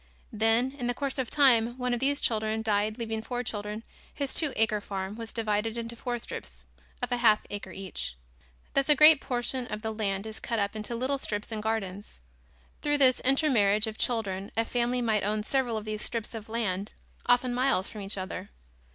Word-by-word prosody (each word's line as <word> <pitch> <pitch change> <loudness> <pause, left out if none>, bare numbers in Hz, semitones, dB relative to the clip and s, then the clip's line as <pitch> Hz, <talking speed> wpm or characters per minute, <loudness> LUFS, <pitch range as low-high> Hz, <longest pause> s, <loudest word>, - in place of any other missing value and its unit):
Then, 225 +4 +3
in 260 -3 -4
the 245 - 0
course 275 -1 -3
of 255 - -1
time, 240 -4 +4
one 250 -1 0
of 240 - 0
these 280 +2 +2
children 220 0 0
died 215 0 +1
leaving 225 -2 -3
four 245 +2 -3
children, 210 -1 -4 0.3
his 280 -2 0
two 310 -4 +2
acre 220 -1 +2
farm 195 0 -4
was 230 -1 -6
divided 220 0 -1
into 230 0 -4
four 240 +1 -3
strips - - -8 0.4
of 245 - -1
a 245 - +2
half 220 -3 +4
acre 205 -2 -5
each. 190 - -5 0.6
Thus 275 +1 +2
a 300 - +8
great 305 0 +8
portion 245 0 -1
of 215 -2 -5
the 220 0 -2
land 200 -2 -2
is 220 0 -6
cut 230 - -2
up 200 0 0
into 215 +2 -3
little 260 +4 0
strips 210 -3 -3
and 215 -1 -3
gardens. 205 - -3 0.6
Through 290 0 +2
the 260 -3 +5
intermarriage 240 -7 +4
of 220 -1 -6
children 200 -5 -1
a 225 - +2
family 245 +1 0
might 220 -3 +1
own 210 +1 0
several 245 -1 0
of 215 - -5
these 215 0 -3
strips 230 -1 -3
of 225 -1 -7
land, 205 -4 -2 0.3
often 245 0 +3
miles 250 -6 +2
from 210 - -8
each 200 +1 -4
other. 185 +1 -5
225 Hz, 200 wpm, -29 LUFS, 210-245 Hz, 0.6 s, a